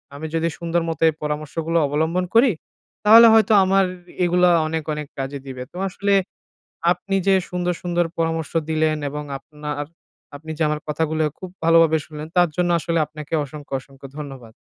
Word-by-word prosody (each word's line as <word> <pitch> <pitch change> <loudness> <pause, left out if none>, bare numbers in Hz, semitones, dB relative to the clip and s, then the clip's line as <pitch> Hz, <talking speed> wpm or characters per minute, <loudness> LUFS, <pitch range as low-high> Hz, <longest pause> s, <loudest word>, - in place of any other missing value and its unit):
আমি 150 +3 -7
যদি 165 0 +1
সুন্দর 170 0 0
মতো 165 - -5
এই - - -2
পরামর্শগুলো 155 +2 -2
অবলম্বন 160 +5 0
করি, 240 +2 +6 0.5
তাহলে 225 +2 +9
হয়তো 220 -1 +5
আমার 195 +1 +3
এ 180 -1 -16
এগুলো 180 +1 +3 0.2
অনেক, 160 0 -2
অনেক 150 -1 -5
কাজে 135 +1 -4
দিবে 130 -1 -6
তো - - -11
আসলে। 200 +2 -1 0.8
আপনি 195 +2 -2
যে 195 - +5 0.2
সুন্দর, 180 0 -1
সুন্দর 175 -1 0
পরামর্শ 165 -1 -1 0.2
দিলেন 155 -1 +1
এবং 150 +1 -5 0.2
আপনার 150 +1 -7 0.6
আপনি 160 +2 -9
যে 160 - 0
আমার 150 0 -1
কথাগুলো 155 +1 0 0.2
খুব 185 - -7
ভালোভাবে 165 -1 +5
শুনলেন 150 0 -8
তার 175 -2 +5
জন্য 180 -1 +1
আসলে 165 0 -1
আপনাকে 150 +1 -10
অসংখ্য, 145 -1 -10
অসংখ্য 135 +1 -14
ধন্যবাদ। 135 -6 -9
160 Hz, 170 wpm, -22 LUFS, 150-175 Hz, 0.8 s, তাহলে